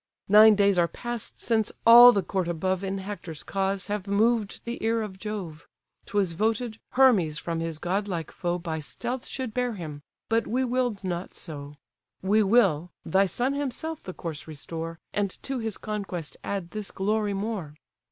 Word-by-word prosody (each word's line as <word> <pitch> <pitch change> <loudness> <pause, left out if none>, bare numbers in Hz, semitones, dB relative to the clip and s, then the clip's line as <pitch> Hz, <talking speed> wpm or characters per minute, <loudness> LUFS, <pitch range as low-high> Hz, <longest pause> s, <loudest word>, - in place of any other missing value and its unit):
Nine 215 +1 +8
days 200 -2 +4
are 170 - +4
past 240 +4 -5
since 220 -3 +1
all 240 +1 +11
the 200 -4 0
court 190 -3 -1
above 185 +3 -1
In 195 0 -2
Hector's 190 -5 -7
cause 195 -1 -1
have 205 0 -3
moved 215 +1 +1
the 235 -1 -5
ear 225 0 +1
of 190 -3 -8
Jove; 190 -7 -6 0.4
'Twas 200 -5 +1
voted, 220 +5 -1
Hermes 215 - +4
from 165 +1 -3
his 165 -1 -3
godlike 180 -1 -2
foe 175 -1 -2
By 165 -2 -4
stealth 240 - -5
should 255 -5 -4
bear 250 -1 0
him, 155 -6 -7 0.3
but 225 +1 +1
we 255 +3 +1
will'd 245 -5 -1
not 180 -1 -4
so: 145 -3 -8 0.5
We 205 +3 +4
will, 195 -7 +3 0.2
thy 195 +1 +3
son 245 +9 0
himself 290 +3 -3
the 185 - -7
corse 165 -4 -6
restore, 165 +2 -6 0.2
And 205 -1 +1
to 270 -2 -3
his 220 -3 -3
conquest 195 -7 -5
add 195 -4 -4
this 215 -2 -4
glory 210 +1 0
more. 195 -7 -4
200 Hz, 170 wpm, -27 LUFS, 175-225 Hz, 0.5 s, all